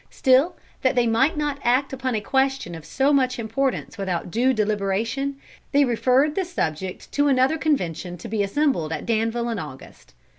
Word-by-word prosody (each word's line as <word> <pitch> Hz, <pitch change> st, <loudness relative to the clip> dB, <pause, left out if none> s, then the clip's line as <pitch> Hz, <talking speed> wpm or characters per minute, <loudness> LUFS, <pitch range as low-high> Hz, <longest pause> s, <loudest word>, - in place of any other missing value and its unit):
Still 265 Hz, +6 st, +3 dB, 0.3 s
that 260 Hz, 0 st, +2 dB
they 245 Hz, -1 st, +3 dB
might 235 Hz, +8 st, +2 dB
not 295 Hz, -2 st, -1 dB
act 260 Hz, +3 st, +2 dB
upon 260 Hz, -2 st, -2 dB
a 215 Hz, -, -1 dB
question 265 Hz, -6 st, 0 dB
of 160 Hz, -2 st, -9 dB
so 270 Hz, -, +1 dB
much 255 Hz, -2 st, +2 dB
importance 235 Hz, 0 st, -2 dB
without 180 Hz, -3 st, -3 dB
due 250 Hz, +6 st, +2 dB
deliberation, 215 Hz, +5 st, -1 dB, 0.4 s
they 285 Hz, 0 st, +5 dB
referred 255 Hz, +4 st, +2 dB
the 385 Hz, -, 0 dB
subject 185 Hz, -, -4 dB
to 290 Hz, 0 st, +2 dB
another 270 Hz, +3 st, +3 dB
convention 180 Hz, -, -1 dB
to -, -, -9 dB
be 215 Hz, -1 st, -1 dB
assembled 200 Hz, -, 0 dB
at 160 Hz, -, -4 dB
Danville 230 Hz, +1 st, 0 dB
in 225 Hz, -3 st, -2 dB
August. 135 Hz, -, -11 dB
245 Hz, 175 wpm, -23 LUFS, 205-275 Hz, 0.4 s, they